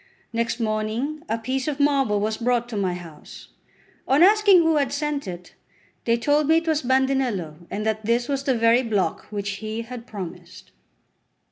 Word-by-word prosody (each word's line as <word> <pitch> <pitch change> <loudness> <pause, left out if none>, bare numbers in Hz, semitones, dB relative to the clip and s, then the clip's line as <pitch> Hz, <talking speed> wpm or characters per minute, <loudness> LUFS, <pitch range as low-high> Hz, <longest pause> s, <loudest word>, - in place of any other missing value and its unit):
Next 230 +1 -1
morning 225 +7 -2
a 225 - 0
piece 260 +4 -3
of 300 -1 -2
marble 275 -7 +2
was 215 +1 -1
brought 240 0 0
to 230 - -6
my 190 -3 0
house. 170 -4 -12 0.6
On 275 +5 +5
asking 405 -2 +6
who 325 -1 +3
had 280 -3 +1
sent 290 -3 -2
it, 180 -1 -8 0.5
they 230 0 +3
told 290 +4 +2
me 320 +1 +5
it 330 0 -2
was 315 -1 +2
Bandinello, 250 - 0
and 210 +1 -4
that 220 0 -1
this 235 +3 +1
was 275 -1 -2
the 265 - +2
very 230 +2 +4
block 205 -9 -1
which 205 -1 -4
he 220 +1 -4
had 240 0 -9
promised. 190 -5 -9
235 Hz, 175 wpm, -23 LUFS, 215-280 Hz, 0.6 s, asking